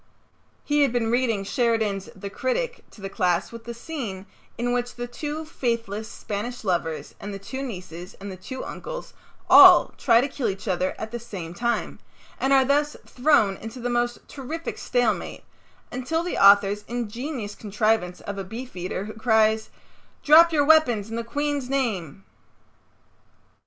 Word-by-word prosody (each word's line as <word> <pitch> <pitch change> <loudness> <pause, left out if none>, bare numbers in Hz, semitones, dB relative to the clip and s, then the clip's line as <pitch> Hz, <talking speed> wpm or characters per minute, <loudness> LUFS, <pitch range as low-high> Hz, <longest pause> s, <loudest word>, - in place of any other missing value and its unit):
He 295 0 +1
had 280 -4 +4
been 230 -2 0
reading 235 -5 +1
Sheridan's 220 -3 0
"The 200 0 -7
Critic" 475 - -2
to 210 - -16
the 195 - -4
class 180 -2 0
with 230 -1 -10
the 235 - -5
scene 230 -8 -6 0.3
in 245 +1 -1
which 245 0 -2
the 240 - -4
two 300 +5 -5
faithless 230 -6 -3
Spanish 225 +4 -5
lovers 170 -5 -2
and 205 - -6
the 200 - -5
two 260 +7 -7
nieces 180 -8 -7
and 200 0 -8
the - - -7
two 260 +8 -7
uncles - - -7 0.3
all - - +9
try 230 -4 +5
to 260 - +1
kill 270 -5 -2
each 195 +3 -6
other 185 0 0
at 220 0 -6
the 240 - -4
same 185 -7 -7
time, 235 +5 -2 0.4
and 265 - 0
are 270 -1 +5
thus 290 +2 +1
thrown 245 -8 +2
into 225 +3 -8
the 245 0 -2
most 240 0 -1
terrific 310 +4 -6
stalemate 245 -3 -1 0.5
until 290 +7 -2
the 355 - -3
author's 200 +1 +6
ingenious 240 0 -4
contrivance 215 -3 -1
of 200 0 -6
a - - -3
beefeater 195 -3 -5
who 215 - -7
cries, 220 -1 +2 0.5
"Drop 330 +3 +7
your 290 -3 +3
weapons 245 -9 +4
in - - -3
the 235 - -2
Queen's 285 +1 -2
name." 195 - -2
230 Hz, 160 wpm, -24 LUFS, 200-260 Hz, 0.5 s, all